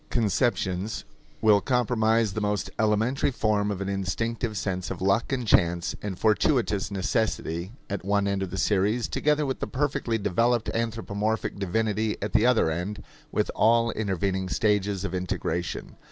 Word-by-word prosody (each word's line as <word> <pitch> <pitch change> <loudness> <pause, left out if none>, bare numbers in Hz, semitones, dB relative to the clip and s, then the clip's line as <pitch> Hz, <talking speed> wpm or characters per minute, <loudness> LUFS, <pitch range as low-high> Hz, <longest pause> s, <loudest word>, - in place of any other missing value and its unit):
Such - - -33
a - - -33
chain - - -2
of 120 - +2
animistic 105 +4 +1
conceptions 100 -3 -1 0.4
will 105 -2 +5
comprise 115 -4 +2
the 110 - -2
most 105 0 -1
elementary 110 +6 +2
form 105 -5 0
of 100 -2 -3
an 100 - -2
instinctive 110 +4 -2
sense 90 -2 -2
of - - -5
luck 100 +7 +1
and 125 -3 -1
chance 85 -3 +2
and 100 -3 -4
fortuitous 110 -1 +2
necessity 95 -3 -1
at 100 -2 -4
one 100 +1 +1
end 100 -1 0
of 95 - -2
the 95 - -5
series, 105 +4 +1
together 150 0 +1
with 130 -1 -2
the - - -3
perfectly 135 -4 -1
developed 115 +3 +1
anthropomorphic 110 -2 -2
divinity 110 +2 0
at 105 - -4
the 110 - +4
other 115 -10 +3
end, 90 +6 -4 0.3
with - - 0
all 115 +1 +3
intervening 95 -3 -1
stages 100 -1 +1
of 95 - -4
integration. 90 -2 -3
105 Hz, 170 wpm, -26 LUFS, 95-115 Hz, 0.4 s, will